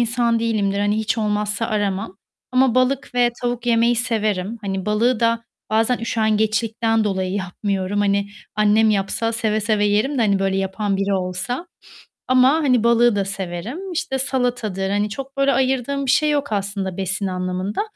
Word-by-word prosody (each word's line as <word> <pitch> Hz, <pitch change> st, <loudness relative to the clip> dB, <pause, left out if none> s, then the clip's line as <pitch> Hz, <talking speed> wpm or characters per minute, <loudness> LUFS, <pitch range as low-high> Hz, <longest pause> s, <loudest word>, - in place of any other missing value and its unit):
insan 235 Hz, 0 st, +1 dB
değilimdir. 210 Hz, -4 st, 0 dB
Hani, 205 Hz, +1 st, +1 dB
hiç 220 Hz, +1 st, -1 dB
olmazsa 210 Hz, 0 st, -1 dB
aramam. 205 Hz, -2 st, -2 dB, 0.4 s
Ama 255 Hz, -2 st, +3 dB
balık 255 Hz, +1 st, +1 dB
ve 245 Hz, -1 st, +3 dB
tavuk 245 Hz, 0 st, -2 dB
yemeyi 235 Hz, 0 st, +3 dB
severim. 215 Hz, -3 st, -1 dB
Hani, 195 Hz, -2 st, -4 dB
balığı 225 Hz, +3 st, +2 dB
da 230 Hz, 0 st, +1 dB, 0.3 s
bazen 225 Hz, +3 st, +2 dB
üşengeçlikten 220 Hz, 0 st, +1 dB
dolayı 190 Hz, -2 st, -1 dB
yapmıyorum. 195 Hz, 0 st, -2 dB
Hani, 200 Hz, 0 st, +1 dB, 0.3 s
annem 215 Hz, +1 st, +4 dB
yapsa 210 Hz, +3 st, 0 dB
seve 220 Hz, -2 st, 0 dB
seve 210 Hz, 0 st, +1 dB
yerim 220 Hz, +7 st, +1 dB
de, -, -, +3 dB
hani, 200 Hz, -3 st, +2 dB
böyle, 195 Hz, 0 st, 0 dB
yapan 195 Hz, +1 st, -1 dB
biri 195 Hz, +1 st, 0 dB
olsa. 185 Hz, -, -3 dB, 0.6 s
Ama, 255 Hz, 0 st, +5 dB
hani, 270 Hz, -8 st, +2 dB
balığı 235 Hz, -1 st, +4 dB
da 200 Hz, -1 st, 0 dB
severim. 195 Hz, -, -5 dB
İşte, 330 Hz, -6 st, -2 dB
salatadır, 245 Hz, -8 st, -1 dB
hani, 205 Hz, +1 st, 0 dB
çok 275 Hz, +4 st, -7 dB
böyle 275 Hz, 0 st, +3 dB
ayırdığım 265 Hz, +1 st, 0 dB
bir 255 Hz, -, +2 dB
şey 305 Hz, -, +3 dB
yok 285 Hz, -4 st, -1 dB
aslında 200 Hz, -2 st, -2 dB
besin 195 Hz, +1 st, -2 dB
anlamında. 185 Hz, -, -2 dB
215 Hz, 160 wpm, -21 LUFS, 200-240 Hz, 0.6 s, Ama